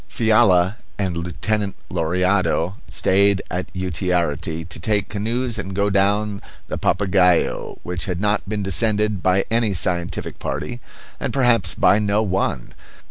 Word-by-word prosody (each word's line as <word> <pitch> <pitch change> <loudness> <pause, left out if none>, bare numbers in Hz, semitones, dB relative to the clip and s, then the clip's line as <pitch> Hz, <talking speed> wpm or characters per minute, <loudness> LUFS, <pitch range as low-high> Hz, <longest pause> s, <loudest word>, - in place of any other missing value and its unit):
Fiala 110 -4 +3 0.2
and 95 -4 -1
Lieutenant 100 +4 -2 0.2
Lauriado 90 +1 +1 0.2
stayed 100 0 +2
at 90 0 -3
Utiarity 85 -3 -2
to 85 - -9
take 105 +3 0
canoes 115 +3 -2
and 95 -2 -5
go 100 +1 +1
down 100 +1 +1 0.3
the - - -3
Papagaio, 95 -2 +2
which 90 0 -4
had 90 -2 -3
not 105 0 0
been 105 -1 -2
descended 105 +2 +1
by 95 +1 +2
any 115 -3 +1
scientific 85 0 -2
party, 120 - -4 0.4
and - - -2
perhaps 120 -9 +3
by 100 - +4
no 105 +1 +1
one. 95 - -2
95 Hz, 135 wpm, -21 LUFS, 90-105 Hz, 0.4 s, by